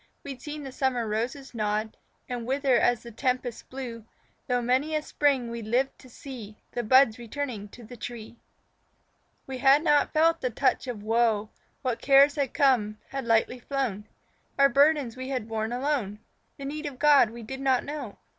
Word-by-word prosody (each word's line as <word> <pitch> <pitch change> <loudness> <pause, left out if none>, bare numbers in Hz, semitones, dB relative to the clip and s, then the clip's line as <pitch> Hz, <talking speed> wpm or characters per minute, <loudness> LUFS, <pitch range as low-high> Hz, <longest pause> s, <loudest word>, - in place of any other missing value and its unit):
We'd 270 -3 -8
seen 295 0 -6
the 270 - -7
summer 255 -3 0
roses 240 +6 -3
nod 215 -1 -1 0.3
And 245 -2 -5
wither 270 0 +2
as 240 -2 +2
the 235 - -9
tempests 250 0 -2
blew, 245 -4 -7 0.4
Through 245 -1 +1
many 265 +6 +1
a 305 - +1
spring 270 -7 +1
we'd 230 -2 -6
lived 255 +4 0
to 255 - -15
see 230 -5 -10
The 240 - -2
buds 250 0 +5
returning 235 -3 -5
to 240 - -13
the 245 +3 -11
tree. 235 0 -8 1.1
We 265 -1 -6
had 275 +3 +5
not 295 -3 +3
felt 325 +2 +3
the 255 - 0
touch 260 +2 0
of 225 -5 -5
woe; 220 -1 +1 0.3
What 250 -3 -2
cares 275 +1 +6
had 280 -4 -1
come, 245 -8 +2
had 270 -2 -4
lightly 230 +2 +2
flown; 245 -6 -3 0.5
Our 275 0 +6
burdens 280 -2 +3
we 260 +1 -6
had 255 -5 -3
borne 220 0 -2
alone 250 -5 -1 0.4
The 275 - -7
need 300 +2 -4
of 275 -3 -7
God 290 -5 +5
we 235 +1 -9
did 265 +4 -7
not 265 -2 +2
know. 285 -7 -6
255 Hz, 180 wpm, -27 LUFS, 230-275 Hz, 1.1 s, cares